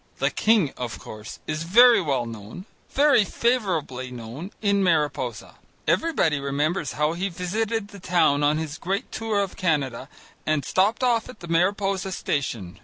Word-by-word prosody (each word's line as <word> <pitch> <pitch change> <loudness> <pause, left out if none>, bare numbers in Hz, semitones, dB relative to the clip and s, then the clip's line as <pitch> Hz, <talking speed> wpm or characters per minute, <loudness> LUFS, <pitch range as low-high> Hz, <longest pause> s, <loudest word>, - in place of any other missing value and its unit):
The - - +1
king, 215 -10 +2
of 120 -2 -4
course, 105 0 -9
is 155 0 -3
very 235 +7 +6
well 140 -7 0
known, 115 - -9 0.2
very 280 -5 +4
favourably 185 - -1
known, 125 - -8
in 200 -2 +2
Mariposa. 145 - -1 0.3
Everybody 175 - +2
remembers 145 +2 -1
how 150 +2 +1
he 185 +3 -2
visited 205 +5 -2
the 200 -2 -11
town 175 -6 +2
on 150 +1 +3
his 155 -1 -5
great 195 +3 -3
tour 220 -2 0
in 195 - -3
Canada, 145 -8 -1 0.3
and 155 -4 0
stopped 200 +7 +1
off 235 -2 +2
at 250 - -11
the 170 - -8
Mariposa 190 +2 +1
station. 115 - -3
170 Hz, 155 wpm, -24 LUFS, 140-200 Hz, 0.3 s, very